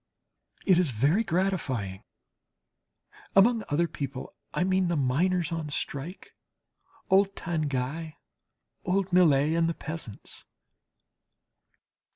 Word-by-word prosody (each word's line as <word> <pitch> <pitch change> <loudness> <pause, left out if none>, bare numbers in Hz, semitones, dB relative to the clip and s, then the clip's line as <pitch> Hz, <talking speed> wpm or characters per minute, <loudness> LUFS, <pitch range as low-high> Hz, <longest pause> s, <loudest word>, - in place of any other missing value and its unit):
It 185 -4 +5
is 180 -5 +2
very 140 - +2
gratifying 155 - -1 1.3
(among 225 +3 +5
"other 170 +4 +2
people," 140 -4 -6 0.2
I - - 0
mean, 185 0 +2
the 170 - 0
miners 165 +6 +1
on 165 -2 -3
strike, 145 +5 -5 0.8
old 195 +1 +4
Tanguy, 155 -1 -2 0.7
old 185 0 0
Millet, 155 -4 +5
and 165 0 +2
the 165 - -2
peasants). 155 -10 -7
165 Hz, 100 wpm, -28 LUFS, 140-185 Hz, 1.3 s, It